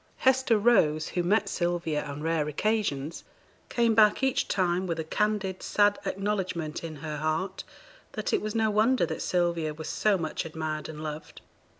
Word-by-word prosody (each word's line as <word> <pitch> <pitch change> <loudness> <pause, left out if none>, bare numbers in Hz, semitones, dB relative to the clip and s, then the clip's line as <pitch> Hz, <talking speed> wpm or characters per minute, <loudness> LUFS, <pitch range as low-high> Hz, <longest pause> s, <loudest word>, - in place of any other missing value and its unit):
Hester 260 -3 +3
Rose, 165 -9 +3
who 175 - -1
met 200 +4 +2
Sylvia 175 -5 -1
on 145 0 -6
rare 160 -2 0
occasions, 165 -3 -1 0.5
came 235 -2 +2
back 215 +3 +4
each 265 -1 +1
time 185 0 0
with 165 -2 -2
a - - -1
candid, 200 +1 -1
sad 205 0 +2
acknowledgement 190 -6 -2
in 160 -2 -6
her 150 +1 -5
heart 160 +6 -2 0.5
that - - -3
it - - +2
was 215 +1 -4
no 220 -1 +2
wonder 215 0 +3
that 160 -1 -5
Sylvia 170 -4 0
was 160 0 -6
so 210 -2 +2
much 160 -3 -3
admired 155 -1 -4
and 155 0 -7
loved. 155 0 -7
175 Hz, 170 wpm, -28 LUFS, 155-210 Hz, 0.5 s, back